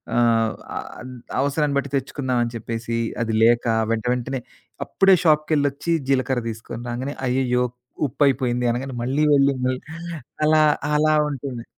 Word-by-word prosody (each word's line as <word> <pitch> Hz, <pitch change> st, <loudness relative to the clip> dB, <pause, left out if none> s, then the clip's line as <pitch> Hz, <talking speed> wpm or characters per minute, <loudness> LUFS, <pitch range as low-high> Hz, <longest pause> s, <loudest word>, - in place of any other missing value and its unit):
ఆహ్, 115 Hz, -2 st, +3 dB, 0.5 s
అద్ 130 Hz, -, -8 dB, 0.3 s
అవసరాన్ని 145 Hz, +1 st, 0 dB
బట్టి 140 Hz, 0 st, -1 dB
తెచ్చుకుందాం 130 Hz, -2 st, -2 dB
అని 115 Hz, -, -3 dB
చెప్పేసి, 115 Hz, +1 st, -4 dB, 0.3 s
అది 115 Hz, -1 st, -2 dB
లేక, 120 Hz, +1 st, +4 dB, 0.3 s
వెంట 115 Hz, 0 st, -1 dB
వెంటనే 125 Hz, +2 st, -3 dB, 0.5 s
అప్పుడే 195 Hz, -1 st, +4 dB
షాప్‌కెళ్ళొచ్చి 150 Hz, -1 st, +2 dB, 0.2 s
జీలకర్ర 130 Hz, -2 st, +1 dB
తీసుకొని 115 Hz, +1 st, -7 dB
రాంగానే, 130 Hz, +4 st, -4 dB
"అయ్యయ్యో! 125 Hz, -1 st, +1 dB, 0.4 s
ఉప్పయిపోయింది" 125 Hz, -2 st, +1 dB
అనగానే 130 Hz, +2 st, -4 dB
మళ్ళీ 135 Hz, +5 st, +1 dB
వెళ్ళి 140 Hz, -1 st, +4 dB
నే 130 Hz, -, +2 dB, 0.7 s
అలా 155 Hz, 0 st, +5 dB, 0.3 s
అలా 155 Hz, +1 st, +3 dB
ఉంటుంది. 135 Hz, -4 st, -5 dB
130 Hz, 125 wpm, -22 LUFS, 120-145 Hz, 0.7 s, అలా